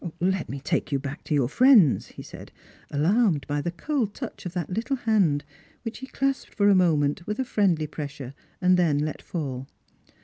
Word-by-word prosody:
" - - -40
Let 185 -1 0
me 140 - -5
take 140 - -2
you 140 - +2
back 140 +2 -6
to 150 - 0
your 135 -4 +2
friends," 220 - +5
he - - -11
said, - - -11 0.4
alarmed 170 - +2
by 145 0 -2
the 170 - -2
cold 220 - -2
touch - - -6
of 175 - -8
that 175 -2 -3
little 230 +8 -1
hand, 195 - +1 0.4
which 225 -1 -6
he 265 - -8
clasped 275 0 -2
for 205 -1 +4
a - - +6
moment 165 -3 +2
with 210 +1 -2
a 260 - -1
friendly 185 -9 +1
pressure 145 -3 -7 0.3
and 180 0 +4
then 165 -5 +2
let 150 +1 -2
fall. 135 -6 -5
175 Hz, 200 wpm, -25 LUFS, 145-210 Hz, 0.4 s, a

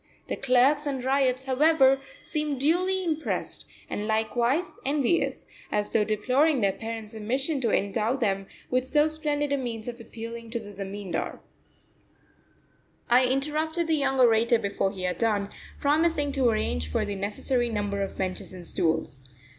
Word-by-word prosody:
The - - -1
clerks 275 +3 +3
and 270 -3 -2
ryots, 265 -1 +2
however, 270 0 +4 0.2
seemed 300 -3 -2
duly 365 +6 +2
impressed, 320 -3 -2 0.2
and 210 - -3
likewise 235 - +1
envious, 285 +3 +1 0.3
as 210 0 -1
though 220 - +4
deploring 255 +8 +2
their 200 -1 +3
parents' 225 +2 -6
omission 265 +7 -1
to 235 - +1
endow 215 +4 +1
them 195 -7 -1 0.2
with 255 0 +2
so 295 +3 +3
splendid 295 -2 +1
a - - +2
means 235 -4 -4
of 240 -1 -6
appealing 230 0 -8
to 235 +1 -3
the 205 -2 -10
Zamindar. 195 -2 -4 1.7
I 250 +1 +6
interrupted 305 +5 0
the 325 - +1
young 270 -2 0
orator 235 -1 +5
before 200 -2 -1
he 190 -2 -6
had 180 -1 -1
done, 210 -3 +1 0.3
promising 295 0 +2
to 265 -3 +2
arrange 80 - -1
for - - 0
the 205 - -3
necessary 225 +5 -1
number 205 -2 -2
of 195 - -4
benches 185 -1 -3
and 180 -2 -9
stools. 160 -5 -1
245 Hz, 155 wpm, -27 LUFS, 210-285 Hz, 1.7 s, I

